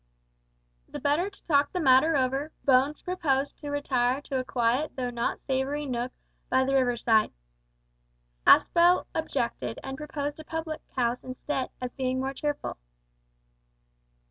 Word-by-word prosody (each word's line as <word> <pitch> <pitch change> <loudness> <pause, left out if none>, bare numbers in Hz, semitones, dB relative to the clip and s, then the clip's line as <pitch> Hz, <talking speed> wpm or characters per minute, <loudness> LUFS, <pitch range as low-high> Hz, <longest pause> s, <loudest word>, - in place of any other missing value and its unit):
The - - -6
better 300 +7 +1
to 400 - -21
talk 285 -2 +3
the 365 - -2
matter 280 +1 +5
over, 270 +4 0
Bones 270 +2 +3
proposed 285 -7 -1
to 290 - -6
retire 260 -3 +1
to 275 -2 -3
a - - -2
quiet 255 +4 0
though 250 -2 -2
not 235 0 -2
savoury 275 +2 -2
nook 250 -1 -2 0.4
by 260 - +3
the 270 - 0
river 250 -3 +2
side. 220 -2 +3 1.2
Aspel 350 +1 +6
objected, 320 -1 -2
and 270 0 -5
proposed 290 0 -4
a - - -7
public 320 0 -4
house 245 -1 0
instead, 255 +1 -3
as 250 -1 -5
being 260 -1 -1
more 265 +1 -2
cheerful. 290 - -3
270 Hz, 145 wpm, -27 LUFS, 255-295 Hz, 1.2 s, Aspel